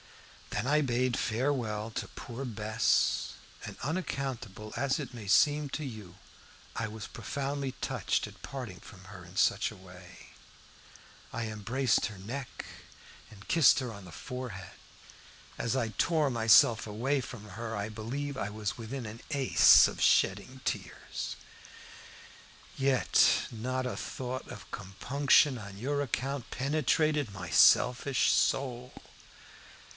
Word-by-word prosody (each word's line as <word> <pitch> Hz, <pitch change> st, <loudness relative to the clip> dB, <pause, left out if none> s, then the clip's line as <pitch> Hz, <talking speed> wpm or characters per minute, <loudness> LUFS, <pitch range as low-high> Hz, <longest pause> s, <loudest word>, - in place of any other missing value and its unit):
Then 105 Hz, -, -2 dB
I 150 Hz, +2 st, +4 dB
bade 125 Hz, -2 st, +1 dB
farewell 115 Hz, -3 st, -1 dB
to -, -, -4 dB
poor 125 Hz, +2 st, -7 dB
Bess, 110 Hz, -3 st, +1 dB, 0.3 s
and, -, -, -8 dB
unaccountable 135 Hz, -, -4 dB
as 135 Hz, +3 st, 0 dB
it 135 Hz, -4 st, -6 dB
may 110 Hz, -4 st, -8 dB
seem 145 Hz, +7 st, +4 dB
to 155 Hz, +2 st, -4 dB
you, 105 Hz, -9 st, -8 dB, 0.6 s
I 110 Hz, -, -2 dB
was 110 Hz, -1 st, -7 dB
profoundly 140 Hz, -1 st, -4 dB
touched -, -, -1 dB
at -, -, -14 dB
parting 120 Hz, -9 st, -7 dB
from 95 Hz, -1 st, -14 dB
her 95 Hz, -2 st, -11 dB
in 90 Hz, +2 st, -14 dB
such -, -, +2 dB
a -, -, -11 dB
way. 90 Hz, -1 st, -14 dB, 1.0 s
I 115 Hz, +1 st, -3 dB
embraced 115 Hz, +4 st, 0 dB
her 105 Hz, -, -10 dB
neck 120 Hz, +7 st, -6 dB, 0.6 s
and 100 Hz, -2 st, -15 dB
kissed 165 Hz, -3 st, +6 dB
her 125 Hz, -4 st, -4 dB
on 100 Hz, -2 st, -11 dB
the 90 Hz, -, -11 dB
forehead. 125 Hz, -, -7 dB, 0.9 s
As 115 Hz, +2 st, -1 dB
I 120 Hz, -4 st, 0 dB
tore 150 Hz, -, +1 dB
myself 110 Hz, -1 st, +5 dB
away 130 Hz, +7 st, 0 dB
from 115 Hz, -5 st, -9 dB
her 115 Hz, +3 st, -5 dB
I 100 Hz, +1 st, -3 dB
believe 130 Hz, +7 st, -4 dB
I 100 Hz, -, -2 dB
was 105 Hz, +1 st, -4 dB
within 120 Hz, +2 st, -6 dB
an 110 Hz, +2 st, -8 dB
ace 140 Hz, -3 st, +7 dB
of -, -, -6 dB
shedding 130 Hz, +1 st, +2 dB
tears. -, -, -4 dB, 1.4 s
Yet, 135 Hz, -1 st, +3 dB
not 130 Hz, +3 st, -3 dB
a 125 Hz, -, -3 dB
thought 130 Hz, 0 st, -5 dB
of 115 Hz, -4 st, -10 dB
compunction 130 Hz, +7 st, +2 dB
on 100 Hz, -2 st, -9 dB
your 140 Hz, +6 st, -1 dB
account 135 Hz, 0 st, -3 dB
penetrated 150 Hz, -1 st, +1 dB
my 90 Hz, -3 st, -7 dB
selfish 125 Hz, -, +5 dB
soul. 125 Hz, -2 st, 0 dB
120 Hz, 135 wpm, -30 LUFS, 105-135 Hz, 1.4 s, ace